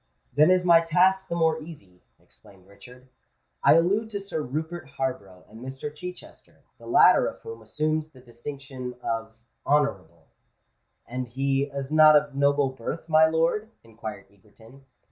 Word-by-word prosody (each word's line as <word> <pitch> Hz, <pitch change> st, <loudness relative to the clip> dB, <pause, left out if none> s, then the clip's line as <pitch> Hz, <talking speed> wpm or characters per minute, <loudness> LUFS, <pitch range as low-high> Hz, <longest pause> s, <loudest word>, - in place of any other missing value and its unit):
"Then 150 Hz, +3 st, +5 dB
is 185 Hz, -1 st, +3 dB
my 170 Hz, -1 st, +6 dB
task 185 Hz, +3 st, +2 dB
the 170 Hz, -, -3 dB
more 160 Hz, -1 st, +1 dB
easy," 100 Hz, -, -13 dB, 0.2 s
exclaimed 100 Hz, -3 st, -20 dB
Richard. 125 Hz, +6 st, -17 dB, 0.6 s
"I -, -, +6 dB
allude 200 Hz, +7 st, +2 dB
to 205 Hz, -2 st, -4 dB
Sir 195 Hz, -5 st, -5 dB
Rupert 155 Hz, +3 st, -5 dB
Harborough 100 Hz, -9 st, -4 dB
and 110 Hz, +2 st, -14 dB
Mr. 135 Hz, +3 st, -7 dB
Chichester, 180 Hz, +4 st, -11 dB, 0.2 s
the -, -, -13 dB
latter -, -, +5 dB
of -, -, -7 dB
whom 455 Hz, 0 st, -9 dB
assumes 155 Hz, 0 st, -2 dB
the 135 Hz, -4 st, -18 dB
distinction 130 Hz, +1 st, -8 dB
of 110 Hz, -1 st, -3 dB, 0.3 s
Honourable." 95 Hz, -, -1 dB, 0.8 s
"And 125 Hz, +1 st, -5 dB
is 120 Hz, -, -24 dB
he 135 Hz, +1 st, 0 dB, 0.2 s
not 155 Hz, 0 st, +7 dB
of 145 Hz, -1 st, +2 dB
noble 140 Hz, -1 st, +2 dB
birth, 130 Hz, +6 st, -6 dB
my 160 Hz, 0 st, +6 dB
lord?" 165 Hz, +7 st, 0 dB
inquired 110 Hz, -1 st, -9 dB
Egerton. 115 Hz, +7 st, -20 dB
145 Hz, 150 wpm, -25 LUFS, 125-160 Hz, 0.8 s, not